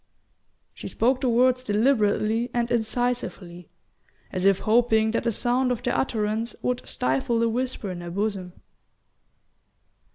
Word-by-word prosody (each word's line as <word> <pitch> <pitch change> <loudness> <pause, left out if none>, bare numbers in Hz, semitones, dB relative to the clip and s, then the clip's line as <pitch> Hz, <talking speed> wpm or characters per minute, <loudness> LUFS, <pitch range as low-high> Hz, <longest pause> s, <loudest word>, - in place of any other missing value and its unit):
She - - -8
spoke 255 +3 +1
the 255 - +1
words 250 +2 +3
deliberately 220 0 +1
and 240 0 0
incisively, 225 -7 -2 0.6
as 185 0 0
if 195 -1 +3
hoping 220 -1 +3
that 230 - -2
the 235 - +2
sound 250 +3 0
of 245 -1 -3
their 245 - 0
utterance 220 -2 -1
would 250 0 -1
stifle 135 - 0
the 230 0 +2
whisper 245 -4 -3
in 175 -1 -6
her 175 - -7
bosom. 195 -1 -3
230 Hz, 135 wpm, -25 LUFS, 205-245 Hz, 0.6 s, words